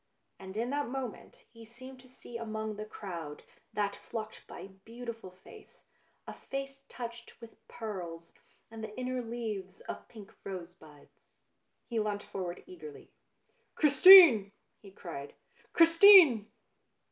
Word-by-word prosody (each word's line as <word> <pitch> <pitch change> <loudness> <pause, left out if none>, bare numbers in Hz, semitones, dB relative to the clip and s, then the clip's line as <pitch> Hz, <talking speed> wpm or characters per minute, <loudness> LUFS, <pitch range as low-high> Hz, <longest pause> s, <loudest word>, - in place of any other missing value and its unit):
And 190 +1 -10
in 235 +3 -2
that 290 0 -2
moment 255 -3 -8
he 230 -1 -14
seemed 255 +3 -13
to 255 0 -19
see 245 -1 -14
among 220 -2 -5
the 210 +1 -7
crowd 170 -9 -8 0.3
that 200 -1 -2
flocked 215 -1 -8
by - - -11
a - - -9
beautiful 225 +2 -10
face, 190 - -18 0.4
a - - -8
face 275 0 -8
touched 235 -1 -9
with 230 -1 -14
pearls, 175 -7 -8 0.4
and 225 -1 -9
the 215 -1 -9
inner 255 0 -3
leaves 220 -5 -6
of - - -9
pink 215 -3 -14
rosebuds. 170 -6 -11 0.7
He 230 -2 -3
leant 210 -1 -3
forward 180 -2 -7
eagerly. 155 -5 -13 0.3
" - - -43
Chris 290 -3 +1
tine! 325 - +9
" - - -49
he 200 - -14
cried, 165 -7 -10 0.2
" - - -32
Christine 330 - +7
220 Hz, 145 wpm, -30 LUFS, 190-250 Hz, 0.7 s, tine